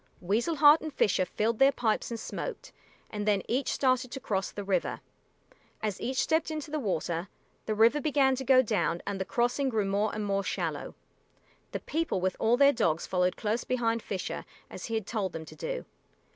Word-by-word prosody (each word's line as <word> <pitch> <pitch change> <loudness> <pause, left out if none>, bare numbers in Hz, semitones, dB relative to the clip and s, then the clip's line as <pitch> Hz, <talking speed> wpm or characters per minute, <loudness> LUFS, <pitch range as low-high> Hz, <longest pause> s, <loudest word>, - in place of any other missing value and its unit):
Weasel 220 - 0
Heart 295 +1 +7
and 315 - -5
Fisher 185 -8 +2
filled 215 +5 -1
their 270 +1 +7
pipes 230 -5 0
and 230 -1 -4
smoked, - - -6 0.4
and 210 0 -4
then 200 -2 +2
each 260 +4 0
started 255 -1 +1
to 270 - -6
cross 195 -7 -1
the 205 - -6
river. 190 -3 -1 0.8
As 210 -3 -2
each 260 +2 -2
stepped 320 +3 +2
into 305 -1 -5
the 305 - -1
water, 175 - -2 0.4
the 215 - 0
river 230 +7 +4
began 275 -3 +3
to 265 - -3
go 260 0 +6
down 205 -6 0
and 200 -1 -3
the - - -1
crossing 245 +5 +1
grew 220 -4 0
more 200 +2 +1
and 215 -1 -2
more 200 0 0
shallow. - - -3 0.8
The - - -4
people 320 - -1
with 185 0 0
all 230 +2 +3
their 280 +1 +6
dogs 165 - +1
followed 180 -1 +1
close 220 +2 -1
behind 230 -2 0
Fisher, 190 -3 -4 0.3
as - - -7
he 225 - -3
had 220 -3 -2
told 205 -4 -2
them 160 -1 -6
to - - -12
do. - - -4
225 Hz, 200 wpm, -29 LUFS, 200-270 Hz, 0.8 s, Heart